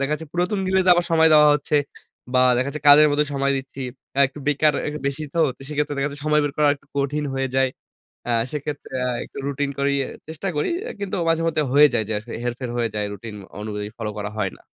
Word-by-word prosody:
দেখা 140 +2 0
যাচ্ছে 160 +1 -7
পুরাতন 180 +4 0
গুলিতে 185 -1 +3
আবার 175 0 +1
সময় 160 0 +6
দেওয়া 150 -1 +7
হচ্ছে। 150 +1 0 0.6
বা - - +5 0.2
দেখা 130 +2 0
যাচ্ছে 150 0 -7
কাজের 150 +1 +9
মধ্যে 145 +1 +2
সময় 140 0 +1
দিচ্ছি। 135 0 -7 0.3
অ্যা 140 - +1
একটু 145 - -12
বেকার 150 +1 +3
এ - - -1 0.2
বেশি 140 +2 -2
তো - - -1 0.3
সেক্ষেত্রে 150 -1 -1
দেখা 140 +1 0
যাচ্ছে 145 0 -9
সময় 150 0 +4
বের 145 - -1
করা 150 -1 +4
একটু 140 - -29
কঠিন 145 +2 0
হয়ে 135 0 -1
যায়। 135 0 +4 0.6
আ - - +2 0.2
সেক্ষেত্রে 150 -1 -5 0.2
আ - - 0
একটু - - -13
রুটিন 140 0 -1
করেই 140 0 +1 0.3
চেষ্টা 160 +4 -5
করি। 150 - 0 0.2
এ - - -4
কিন্তু 200 -1 -3
মাঝেমধ্যে 165 -1 +1
হয়ে 150 +1 +8
যায় 115 -2 +1
যে - - -1
আসলে 115 +2 -10
হেরফের 120 +1 -3
হয়ে 115 -1 0
যায় 105 -1 -1
রুটিন 105 +2 -8 0.2
অনুযায়ী 105 -1 -4
ফলো 110 -2 -3
করা 105 0 -4
হয় 95 -3 0
না। - - -22
145 Hz, 225 wpm, -22 LUFS, 130-150 Hz, 0.6 s, কাজের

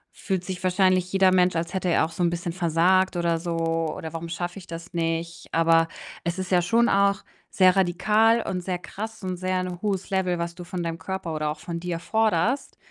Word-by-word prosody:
fühlt 190 -3 -2
sich 185 -1 -5
wahrscheinlich 185 -1 +2
jeder 190 -1 +4
Mensch, 180 -1 +3
als 170 +2 -2
hätte 185 -1 -1
er 165 - +3
auch 165 - -7
so 175 - -2
'n 170 - +3
bisschen 175 0 -3
versagt 180 +2 +2
oder 170 -1 +1
so, 170 -1 -3 0.4
oder: 160 0 -7
„Warum 165 0 -5
schaffe 175 +3 -4
ich 180 - -14
das 170 +2 -8
nicht?“ 165 0 -2
Aber 165 0 +4 0.4
es 170 +2 -2
ist 185 0 -4
ja 180 -1 +5
schon 230 +7 +3
auch 200 0 +2 0.3
sehr 185 0 +4
radikal 210 +5 +3
und 180 -1 -3
sehr 180 -1 -2
krass 220 +2 -7
und 185 -1 -3
sehr 185 0 -1
'n 180 -1 -5
hohes 195 -3 -2
Level, 185 -2 +1
was 170 0 -3
du 180 - -8
von 175 0 -4
deinem 165 0 -4
Körper 175 -1 -4
oder 155 -1 -1
auch 150 +1 -4
von 170 -1 -5
dir 175 -1 -3
forderst. 220 +6 0
180 Hz, 220 wpm, -25 LUFS, 170-190 Hz, 0.4 s, ja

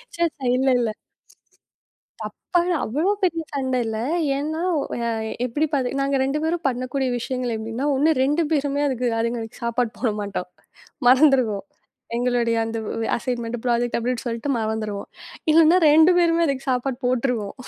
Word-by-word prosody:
ச, - - -13 0.2
ச. - - -51 0.2
இல்ல, 265 +1 +1
இல்ல. 235 - 0 1.3
தப்பா 350 - -1 0.2
அவ்வளவு 315 - +1
பெரிய 335 -2 +1
சண்டை 260 -2 0
இல்ல. 220 -1 -3 0.4
ஏன்னா 310 +3 -3 0.2
ஒ - - 0 0.6
எப்படி 290 +6 0
பாத்தீங்க 275 -1 0
நாங்க 275 0 +1
2 275 +3 0
பேரும் 325 -2 -1
பண்ணக்கூடிய 255 +1 -2
விஷயங்கள் 250 -1 -3
எப்படின்னா, 225 +5 -3
ஒண்ணு 305 +4 +3
2 300 +4 +1
பேருமே 285 -1 0
அதுக்கு 250 -2 -1
அதுங்களுக்கு 230 0 -4
சாப்பாடு 235 -1 0
போடமாட்டோம். 205 -5 -2 0.6
மறந்துடுவோம். 255 -7 +4 0.5
எங்களுடைய 240 -1 +1
அந்த 225 0 -4 0.4
அசைன்மெண்ட், 240 -1 -3
ப்ராஜெக்ட் 240 -1 +1
அப்படின்னு 245 0 -2
சொல்லிட்டு 235 +4 -3
மறந்துடுவோம். 215 -2 -3 0.4
இல்லைன்னா 325 +2 +6
2 315 +4 +6
பேருமே 335 -1 +3
அதுக்கு 275 -1 -2
சாப்பாடு 250 0 -1
போட்டுருவோம். 245 -4 0
255 Hz, 135 wpm, -23 LUFS, 230-285 Hz, 1.3 s, இல்லைன்னா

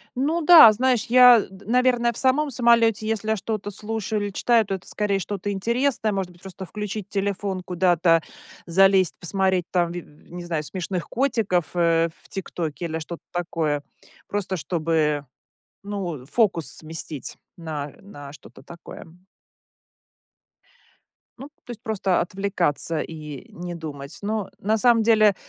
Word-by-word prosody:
Ну 300 +7 0
да, 320 -7 +10
знаешь, 245 0 +1
я 250 -1 +8
д 190 +1 -15
наверно, 245 +1 +2
в 235 - -10
самом 275 +3 +2
самолете 230 -3 +3
если 220 -1 -2
я 220 - +3
что-то 210 0 -4
слушаю 215 0 -3
или 205 0 -3
читаю, 230 +3 +2
то 195 - -3
это, 190 - -10
скорее, 205 -2 -1
что-то 200 +1 -4
интересное 235 +3 0
может 190 -3 -3
быть. 175 - -22
Просто 190 0 -9
включить 210 +1 -5
телефон, 195 -1 -2
куда-то 175 -2 +2 0.4
залезть, 190 +1 +4
посмотреть, 190 0 0
там, 175 -2 +1
ви 175 - -5
не 175 +4 -11
знаю, 165 -3 -2
смешных 180 +1 -4
котиков, 225 - 0
э, 165 -1 +3
в - - -17
"ТикТоке" 170 -4 -5
или 160 -1 -3
что-то 165 +2 -8
такое, 160 -4 -2 0.4
просто 195 -2 -2
чтобы, 155 -3 0 0.6
ну, 185 -10 -5
фокус 180 - +1
сместить 160 -2 -6 0.2
на 150 -4 -6
на 145 -8 -11
что-то 150 - -15
такое. 170 0 -11 2.3
Ну, 270 +3 -9 0.2
то - - -8
есть 235 - -9
просто 195 -4 0
отвлекаться 175 -4 -1
и 150 -4 -8
не 175 0 -7
думать. 145 -4 -8
Ну, 210 -1 -2
на 215 +3 +1
самом 230 0 +4
деле 215 -3 +5
195 Hz, 145 wpm, -23 LUFS, 170-220 Hz, 2.3 s, да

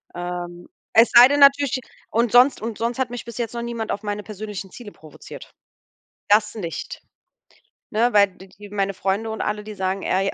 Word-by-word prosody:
Ähm, 175 0 -6 0.3
es 230 +1 +6
sei 240 +1 +10
denn 285 +1 0
natürlich 280 -1 +5 0.3
und 230 0 0
sonst 250 +1 +5
und 225 -1 -5
sonst 235 +2 -3
hat 260 -2 0
mich 245 0 -7
bis 235 -1 -9
jetzt 235 -2 -3
noch 235 - -4
niemand 235 -2 -4
auf 200 - -3
meine 205 0 -4
persönlichen 205 -2 -8
Ziele 240 -4 -11
provoziert. 155 -2 -13 0.8
Das 210 +1 +3
nicht, 175 -7 -6 0.9
ne, 235 +3 +1
weil 200 -1 +6
d 190 - -14
die 200 +2 -14
meine 195 -1 -2
Freunde 195 +4 -2
und 220 - -5
alle, 210 0 -3
die 215 0 -8
sagen, 190 -1 -3
äh, 195 +1 0
ja,: - - -2
210 Hz, 195 wpm, -22 LUFS, 195-235 Hz, 0.9 s, sei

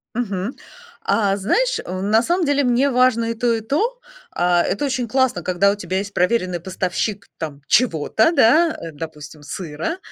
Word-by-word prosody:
Мгм. 210 -1 -3 0.5
А 210 - +2
знаешь, - - +1
э, 185 +1 -5
на 210 +3 +3
самом 345 +7 0
деле, 285 -1 +2
мне 250 +2 +2
важно 250 -2 +3
и - - -1
то, 235 +1 +1
и 225 - -2
то. 425 - -1 0.3
А, 175 0 +2
это 245 - -1
очень 255 -3 -1
классно, 260 -6 +1
когда 185 +3 +2
у - - -2
тебя 185 -2 -3
есть 200 +1 -4
проверенный 180 -2 +1
поставщик 190 +3 -3
там 150 -3 -6
чего-то, 220 - +3
да, 320 +3 +4
э, 165 - -7
допустим, 150 -1 -9
сыра. 160 - -5
210 Hz, 170 wpm, -20 LUFS, 180-255 Hz, 0.5 s, да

